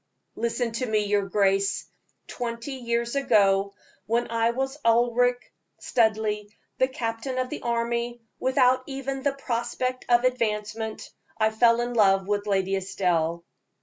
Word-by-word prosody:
"Listen 235 +1 -1
to 230 +3 -2
me, 215 -1 +1
your 205 -1 +1
grace. 195 -1 +1 0.4
Twenty 235 +2 -5
years 235 -1 -2
ago, 200 -7 +3 0.3
when 235 +1 0
I 230 0 +2
was 270 +4 -2
Ulric 245 +1 +2 0.2
Studleigh, 220 -2 +1 0.3
a 260 - +4
captain 255 -1 -4
in 255 0 -1
the - - -5
army, 235 0 -1 0.2
without 255 0 +3
even 270 -1 -4
the 280 0 +1
prospect 255 -1 -3
of 240 0 +5
advancement, 220 -3 -2 0.3
I 220 0 +2
fell 230 +1 +4
in 240 0 -2
love 195 -4 +3
with 205 0 -1
Lady 195 -1 +1
Estelle." 170 -3 -1
235 Hz, 135 wpm, -26 LUFS, 210-245 Hz, 0.4 s, of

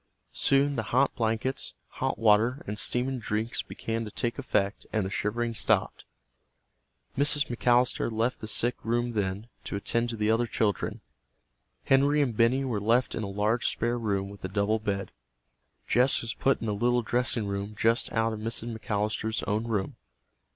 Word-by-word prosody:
Soon 140 +1 +3
the - - +1
hot 130 +3 +3
blankets, 115 +3 -1
hot - - -2
water, 115 +4 +3
and 105 +1 -5
steaming 125 +1 0
drinks 110 +1 -2
began 115 0 -4
to 110 - -6
take 120 +4 -2
effect 100 -6 -1
and 110 -3 0
the 95 - -4
shivering 115 +4 -1
stopped. - - +1 1.1
Mrs. 145 -3 +3
McAllister 120 0 +2
left 115 +3 -1
the 110 - -5
sick 120 +3 +2
room 120 +2 0
then, 100 +1 -2 0.2
to - - -5
attend 115 +4 -1
to 115 - -3
the 105 +1 +2
other 115 +2 +2
children. 105 -4 -1 0.8
Henry 140 +2 +4
and 130 -6 +1
Benny 125 +5 +3
were 115 -6 -2
left 120 +4 +2
in - - -3
a 105 - -3
large 105 +4 +1
spare 120 +1 0
room 100 -3 -1
with 100 0 -12
a - - -1
double 105 +3 +1
bed. 100 -2 -3 0.8
Jess 125 +1 +3
was 115 - -4
put 135 -2 +1
in - - -2
a 105 - 0
little 120 +3 +1
dressing 120 -1 0
room 100 +1 -4
just 115 +2 +2
out 115 -1 +1
of 110 - -5
Mrs. 115 +1 -3
McAllister's 110 0 -2
own 110 +2 -1
room. 105 -5 -2
115 Hz, 170 wpm, -28 LUFS, 105-120 Hz, 1.1 s, Henry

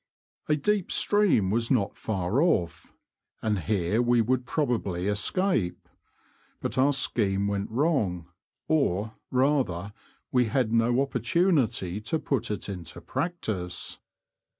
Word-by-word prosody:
A 150 - +4
deep 195 +5 0
stream 195 - +3
was 115 +2 +1
not 115 -7 +1
far 100 +4 -1
off, 85 - 0 0.5
and 105 -3 +1
here 100 +3 0
we 120 0 +3
would 125 +2 +1
probably 115 - -1
escape. 105 - 0 0.7
But - - -3
our 135 +2 +4
scheme 100 -7 +1
went 100 0 -2
wrong 110 - 0 0.2
— - - -63
or, 110 - +1 0.2
rather, 125 -9 +1 0.4
we 125 -1 +3
had 115 0 0
no 120 +3 +3
opportunity 125 - +1
to 160 +9 -1
put 130 -6 -1
it 105 - -3
into 90 -5 -7
practice. 95 - -3
115 Hz, 125 wpm, -27 LUFS, 100-140 Hz, 0.7 s, A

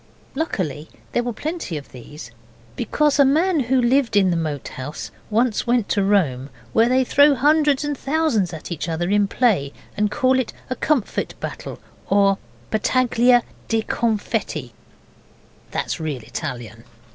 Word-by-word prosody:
Luckily 165 - -3 0.2
there 240 - +1
were 240 0 -3
plenty 300 - -4
of 145 - -10
these, 125 0 -11 0.4
because 295 -1 +1
a - - +8
man 320 +5 +3
who 260 0 +2
lived 245 -1 +2
in 190 -3 +4
the - - +1
Moat 155 -4 -3
House 130 +4 -7 0.2
once 230 +1 +1
went 235 -3 +2
to 200 - +2
Rome, 150 -10 +1 0.2
where 230 +1 +4
they 260 +1 +3
throw 285 +3 +5
hundreds 295 +1 +3
and 295 0 -2
thousands 275 - 0
at 160 +1 -8
each 170 0 -3
other 175 +3 -1
in 205 -1 +3
play, 195 - +1 0.2
and 210 0 +1
call 260 +4 +2
it 255 - -3 0.2
a - - 0
Comfit 275 -4 -1
Battle - - -6 0.3
or 195 -1 +3 0.3
Battaglia 245 +2 +3 0.2
di 225 -1 +1
Confetti 210 - -2 1.0
(that's - - -3
real 150 -7 -4
Italian). 115 -1 -6
220 Hz, 150 wpm, -22 LUFS, 165-260 Hz, 1.0 s, a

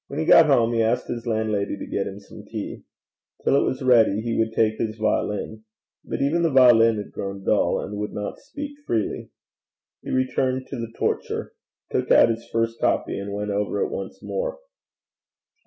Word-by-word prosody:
When 140 - -7
he 160 - 0
got 165 0 +7
home, 120 -5 +3
he 115 - +2
asked 115 +3 0
his 120 0 -4
landlady 110 -3 -1
to - - -6
get 100 - -2
him 95 - -7
some 100 - -13
tea. - - -6 0.6
Till - - +3
it - - +4
was 130 +1 -2
ready 115 -5 +4
he 115 0 -2
would 110 0 +1
take 110 -1 +1
his 110 -1 -2
violin. 110 0 -1 0.4
But - - -3
even 160 +5 +1
the 165 - +3
violin 120 -5 +6
had 105 - -6
grown 100 0 -6
dull, - - +2
and 105 0 -5
would 105 - -3
not 105 0 -5
speak 290 0 -8
freely. 110 -3 -2 0.7
He - - -9
returned 130 0 0
to 135 - -4
the 115 -1 -5
torture - - -2 0.4
took - - -1
out - - +6
his 115 +1 -4
first 115 0 -1
copy, - - 0
and 100 +1 -5
went 105 +1 -3
over 100 +1 -1
it 450 - 0
once 470 - -6
more. - - -3
115 Hz, 190 wpm, -24 LUFS, 105-130 Hz, 0.7 s, got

